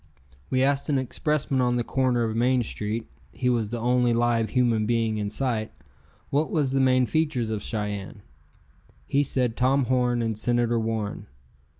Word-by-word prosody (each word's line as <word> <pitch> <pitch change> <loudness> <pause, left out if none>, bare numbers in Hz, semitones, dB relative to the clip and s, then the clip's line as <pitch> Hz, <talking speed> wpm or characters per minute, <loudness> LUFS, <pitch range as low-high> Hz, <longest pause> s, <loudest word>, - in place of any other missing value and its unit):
We 130 0 +2
asked 140 +2 +1
an 140 - +2
expressman 135 +1 0
on 125 -1 +2
the 120 - 0
corner 125 -1 +1
of 110 -1 -2
Main 125 +2 +2
Street 110 +1 -4 0.2
he 125 - -1
was 115 -4 0
the 120 - -3
only 120 +1 +2
live 115 -1 +1
human 120 -4 +1
being 115 -2 0
in 105 -1 -2
sight 110 -1 -2 0.6
what 150 +3 +1
was 145 -5 0
the 135 0 +2
main 130 -1 +4
features 150 -7 0
of 105 -2 -2
Cheyenne. 105 -1 -4 0.8
He 140 - +1
said 125 -4 0
Tom 130 +2 +2
Horn 125 -1 +1
and 110 -1 -1
Senator 120 +1 +1
Warren. 110 -2 -3
120 Hz, 170 wpm, -25 LUFS, 115-130 Hz, 0.8 s, main